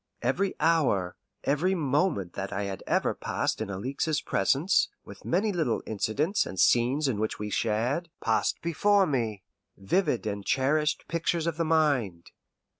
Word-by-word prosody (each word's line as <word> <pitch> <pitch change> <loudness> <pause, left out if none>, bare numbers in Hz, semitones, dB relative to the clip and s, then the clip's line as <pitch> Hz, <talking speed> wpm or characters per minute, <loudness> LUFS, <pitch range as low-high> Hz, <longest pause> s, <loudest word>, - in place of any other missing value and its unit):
Every 195 -1 0
hour, 145 - +2 0.3
every 170 +7 +1
moment 145 - 0
that 95 0 -5
I 100 - -2
had 100 -2 -5
ever - - +1
passed - - -2
in 110 - -3
Alixe's 135 +10 -2
presence, 140 - +2 0.2
with - - -12
many 205 +5 +1
little 160 -10 0
incidents 140 - 0
and 95 - -6
scenes 125 - +3
in 115 -6 -1
which 110 0 -2
we 105 0 -5
shared, 120 - 0
passed - - 0
before 200 +4 +3
me 115 - -2 0.3
vivid 120 - 0
and 100 -1 -3
cherished 150 +6 +1
pictures 170 0 -1
of 165 -1 -2
the 165 - 0
mind. 140 - +1
140 Hz, 150 wpm, -28 LUFS, 105-165 Hz, 0.3 s, scenes